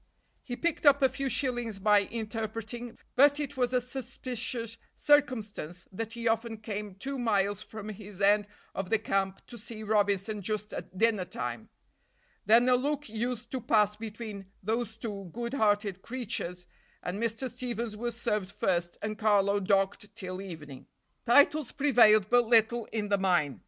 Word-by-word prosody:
He 245 - -5
picked 330 +1 0
up 280 0 +6
a 265 - +6
few 275 0 -3
shillings 240 -6 -1
by 205 +1 +5
interpreting, 225 +1 -5 0.2
but 285 +2 +6
it 285 -1 -3
was 250 -2 +1
a 250 - +3
suspicious 245 -2 -5 0.2
circumstance 220 - +1
that 225 +3 -5
he 235 0 -3
often 225 0 0
came 210 -2 -5
two 270 +7 -4
miles 205 -3 +1
from 215 0 -8
his 205 -2 -9
end 205 +1 +4 0.3
of 195 -1 -4
the 225 - +4
camp 195 -2 -1
to 240 - -11
see 215 0 -8
Robinson 205 0 +1
just 210 +1 -3
at 185 - -7
dinner 220 -3 +2
time. 120 -10 -5 0.8
Then 230 +3 +6
a 255 - +5
look 290 +1 -1
used 235 +2 -3
to 260 - -2
pass 210 -2 +3
between 215 -2 -7 0.2
those 220 +1 -2
two 200 -5 -6
good 235 +1 -4
hearted 205 -5 +1
creatures, 210 -8 -4 0.4
and 190 +4 -3
Mr. 230 +3 0
Stevens 235 -3 -4
was 235 +2 -3
served 210 -4 -1
first 175 -3 0
and 215 0 -3
Carlo 205 -2 +3
docked 200 +2 0
till 185 -3 -6
evening. 155 -8 -9 0.4
Titles 285 +2 +5
prevailed 230 -8 +5
but 245 0 +5
little 230 0 +4
in 210 -2 -3
the 200 -1 +2
mine. 160 - +1
220 Hz, 160 wpm, -30 LUFS, 200-240 Hz, 0.8 s, up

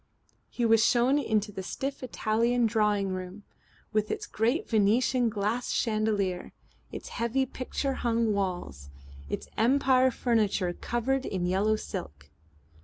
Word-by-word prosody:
He 240 - -1
was 225 -1 +5
shown 250 +5 +3
into 215 -5 0
the 190 - -6
stiff 270 +8 -4
Italian 235 0 +1
drawing 210 -3 +1
room, 185 +2 -6 0.5
with 215 0 +1
its - - -3
great 235 +9 0
Venetian 230 +3 +2
glass 215 +4 -2
chandelier, 215 -5 0 0.4
its - - -7
heavy 235 +3 0
picture 265 +2 -3
hung 230 -3 +1
walls, 175 - -3 0.4
its - - -4
Empire 260 +2 +4
furniture 215 -7 0
covered 255 +7 -1
in 185 -7 -2
yellow 195 +4 +2
silk. 75 - -7
220 Hz, 125 wpm, -28 LUFS, 200-245 Hz, 0.5 s, was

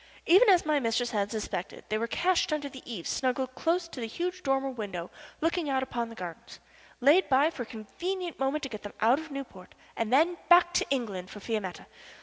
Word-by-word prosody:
Even 390 +7 +7
as 360 -4 +5
my 305 -1 +2
mistress 235 -1 0
had 205 -2 0
suspected, 210 -4 -4
they 215 - +1
were 230 - -1
cached 355 +6 +1
under 300 -2 -1
the 265 -2 -10
eaves, 180 -8 -5
snuggled 255 0 -1
close 340 +6 +1
against 335 -7 -8
the 230 - -2
huge 360 +9 -3
dormer 270 -2 0
window 195 -8 -5 0.3
looking 330 -1 0
out 265 -1 +1
upon 235 -3 -3
the 230 - -10
gardens; 175 -5 -8 0.4
laid 300 +9 +5
by 280 +4 +4
for 270 - -7
a - - -3
convenient 345 - -5
moment 270 +3 0
to 270 - -3
get 215 -3 -7
them 205 - -8
out 240 +6 +5
of 320 0 -9
Newport, 270 -10 -8 0.2
and 225 0 -2
then 325 +7 +4
back 350 0 +7
to - - +1
England 205 -9 -2
for 210 - -9
Fiametta. 205 -4 -4
265 Hz, 210 wpm, -29 LUFS, 220-325 Hz, 0.4 s, Even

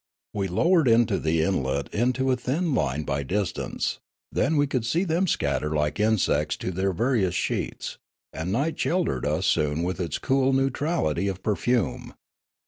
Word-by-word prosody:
We 100 -2 -1
lowered 165 - +3
the 85 -9 +3
islet 70 -7 -1
into 125 +3 +1
a - - +3
thin 145 +7 -1
line 70 - 0
by 70 -1 -1
distance; 95 +6 -2 0.3
then 160 - +1
we 145 - +4
could 130 -4 -1
see 160 +11 +1
them 180 +1 +1
scatter 75 - 0
like 75 +2 0
in 110 +1 +3
sects 75 -4 0
to - - -2
their 95 +2 0
various 100 -3 +1
sheets; - - -3 0.3
and 80 +4 -3
night 140 +9 -1
sheltered 170 - 0
us - - 0
soon 75 +2 +1
with 90 +2 -2
its 85 -4 -2
cool 135 0 +2
neutrality 135 - 0
of 95 -1 -4
perfume. 115 +1 -1
105 Hz, 160 wpm, -25 LUFS, 80-135 Hz, 0.3 s, we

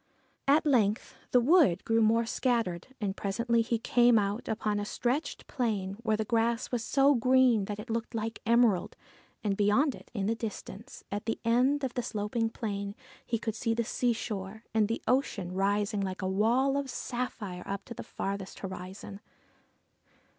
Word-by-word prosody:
At 300 +4 +4
length 225 -7 +2 0.2
the 250 - +5
wood 255 - +4
grew 225 0 +3
more 225 +1 +3
scattered, 230 -8 0
and 200 -3 -2
presently 230 +4 +1
he 230 +1 0
came 240 +1 +4
out 205 +2 -1
upon 210 -1 -1
a - - -2
stretch 245 +8 -1
of - - -17
plain 210 -7 -1
where 220 -2 +1
the 220 - -1
grass 230 +2 0
was 240 -3 -1
so 275 +4 +4
green 250 -3 +4
that 205 +1 -4
it 210 - -7
looked 230 +1 -3
like 225 0 -3
emerald; 230 -5 +3 0.5
and 205 -2 +1
beyond 210 +9 +3
it - - -13
in 205 -5 -2
the 220 - +2
distance, 225 -2 -7
at 205 +3 -4
the 225 - 0
end 255 +5 +3
of 260 - -1
the 245 - -1
sloping 225 +1 -1
plain, 200 -3 -4 0.3
he 230 - -1
could 220 0 -3
see 225 +1 -1
the 235 - +1
seashore, 220 -3 -2
and 220 -2 +3
the 230 - -3
ocean 220 -8 0
rising 205 +2 +1
like 190 -1 -3
a - - 0
wall 235 +8 +2
of 280 -1 -2
sapphire 240 -7 -4
up 200 0 -4
to 235 - -7
the - - -7
farthest 195 -1 -5
horizon. 190 +1 -7
225 Hz, 175 wpm, -30 LUFS, 200-240 Hz, 0.5 s, the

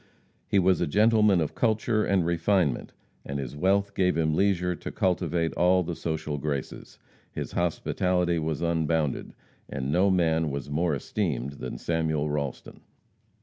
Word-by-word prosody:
He - - +1
was 95 -1 +3
a 85 - +1
gentleman 105 +2 +4
of 80 - -2
culture 110 -1 +1
and 95 -3 +1
refinement, 85 -3 +1 0.3
and 70 - -4
his 70 -1 -5
wealth 100 +5 +1
gave 90 -2 +1
him 80 -1 +1
leisure 90 0 +1
to - - -7
cultivate 85 -2 0
all 90 +1 +3
the 85 0 -4
social 80 -3 -3
graces. 70 -2 -5 0.3
His - - -5
hospitality 90 0 0
was 80 0 -2
unbounded, 80 -3 -1 0.3
and 65 +1 -3
no 90 +5 +3
man 80 -4 +2
was 70 0 -5
more 80 +1 +1
esteemed 70 - -3
than 65 - -5
Samuel 80 -3 -1
Ralston. 70 -3 -4
85 Hz, 145 wpm, -27 LUFS, 75-95 Hz, 0.3 s, gentleman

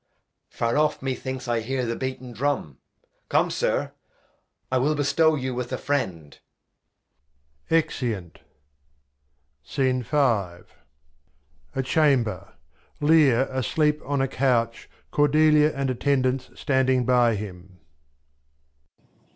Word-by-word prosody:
Far 115 +5 -1
off 150 -3 0
methinks 130 -1 -4
I 120 -1 +1
hear 125 +3 -2
the 115 0 -2
beaten 130 -1 -5
Drum, 120 - -2 0.5
Come, - - +2
Sir, - - -1 0.8
I 130 - +2
will 150 +4 +1
bestow 150 +2 +2
you 130 -2 -3
with 125 0 -4
a 130 - -2
Friend. 95 - -3 1.3
{Exeunt. 120 - -1 1.4
A 125 - +1 1.2
Chamber. 125 - +1 0.5
Lear 145 -5 +4
a 130 0 -1
sleep 150 +4 +1
on 140 -1 -1
a - - +1
Couch; 120 -4 0 0.2
Cordelia, 150 +1 +4
[Physician] 140 - -8
and 135 -1 0
Attendants 130 0 0
standing 130 -3 +1
by 120 -2 +3
him. 95 -3 -9
130 Hz, 100 wpm, -24 LUFS, 115-145 Hz, 1.4 s, Lear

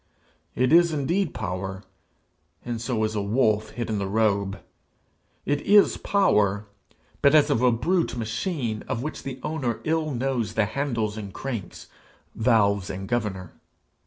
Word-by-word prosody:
It 130 +4 +2
is 170 0 +6
indeed 165 +5 0
power, 95 +2 -4 0.8
and 120 -2 -3
so 115 -2 -1
is 110 0 0
a 105 - -1
wolf 110 0 +1
hid 120 -1 -4
in 110 -2 -1
the 100 - -2
robe; 100 -1 +1 0.9
it 145 0 0
is 205 0 +5
power, 105 - +2 0.6
but 140 +2 +5
as 150 - +5
of 115 - +2
a 125 -1 +5
brute 165 +6 0
machine, 115 - -3
of 115 - -2
which 155 - -5
the 130 -1 -6
owner 135 -7 -2
ill 160 0 0
knows 125 -5 -2
the 110 - +3
handles 115 -4 -2
and 100 -2 -6
cranks, 115 -6 -6 0.5
valves 100 -5 +2
and 95 0 -5
governor. 100 -6 -2
115 Hz, 150 wpm, -25 LUFS, 105-140 Hz, 0.9 s, is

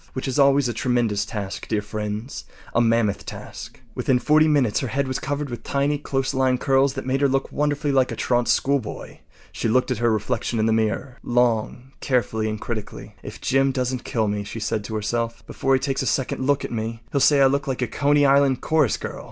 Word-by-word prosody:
Which 130 - -4
is 135 +2 -1
always 140 -1 +4
a 120 - -2
tremendous 115 -4 0
task, 100 -3 -5
dear 105 -2 -1
friends—a 105 +3 -4
mammoth 115 -3 +1
task. - - -9
Within 130 - +1
forty 155 +4 +4
minutes 140 -8 +2
her 130 - -3
head 135 +4 -1
was 130 - -2
covered 145 -1 -3
with 120 - -6
tiny, 140 +1 0
close 135 -2 -2
lying 130 -1 +2
curls 135 +1 +2
that 135 - -5
made 135 +1 0
her 140 - +5
look 135 0 -1
wonderfully 145 0 0
like 130 -2 +2
a - - -3
truant 120 -1 0
schoolboy. 140 -5 -1 0.3
She - - -2
looked 125 +3 +2
at - - -1
her 120 -1 +2
reflection 115 +2 -1
in 110 - +2
the 110 - +2
mirror 110 +4 -1
long, 120 +1 0
carefully, 110 -4 0
and 110 0 -4
critically. 110 -2 -6
“If - - -9
Jim 135 +1 +2
doesn’t 130 -1 -2
kill 110 -3 -1
me,” 105 0 -2
she 115 - -7
said 110 0 -2
to 110 - -5
herself, 115 +2 -2
“before 135 0 0
he - - +1
takes 135 0 -1
a - - -2
second 130 -1 -1
look 145 0 +2
at - - -7
me, 115 0 -4
he’ll 140 - +2
say 145 +1 +5
I 135 - +6
look 140 +1 +1
like 130 -1 -1
a - - -1
Coney 145 +4 +2
Island 140 -1 +4
chorus 155 -7 +2
girl. - - -6
130 Hz, 215 wpm, -23 LUFS, 115-140 Hz, 0.3 s, I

